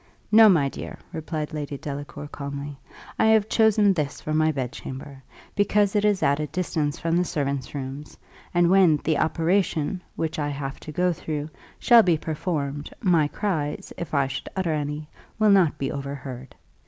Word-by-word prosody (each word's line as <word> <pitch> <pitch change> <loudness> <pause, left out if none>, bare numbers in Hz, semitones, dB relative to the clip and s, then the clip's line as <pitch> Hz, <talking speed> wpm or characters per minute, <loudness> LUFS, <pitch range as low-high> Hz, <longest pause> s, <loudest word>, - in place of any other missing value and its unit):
"No, 220 0 +8
my 160 -8 +4
dear," - - -7 0.2
replied 155 -1 -4
Lady 145 -2 -4
Delacour, 145 +1 -6
calmly. 140 0 -6 0.4
"I - - +4
have 220 -1 +4
chosen 215 -3 +4
this 150 -5 -2
for 155 - -4
my 155 0 +3
bedchamber, 135 0 -6 0.3
because 205 0 +2
it 205 - +3
is 205 -5 +2
at 140 0 +3
a 150 - -2
distance 155 -3 -2
from 165 0 -1
the 175 - +3
servants' 140 -4 -3
rooms; 140 +2 -6 0.3
and 175 0 +3
when 185 -5 +5
the 160 -1 +1
operation, 165 +1 0
which 160 -1 -2
I 145 -1 -1
have 140 -1 -5
to 155 - -9
go 180 +3 +1
through, 155 -1 -5 0.3
shall 235 -2 +7
be 175 -6 +2
performed, 150 -2 -3
my 170 -8 +3
cries, 150 -3 -3
if 170 -3 -5
I 140 -1 +3
should 135 +1 -5
utter 185 -4 0
any, 150 0 -3 0.3
will 215 -1 +4
not 175 -6 +4
be 135 -2 -2
overheard. 135 -3 -7
155 Hz, 170 wpm, -25 LUFS, 145-180 Hz, 0.4 s, No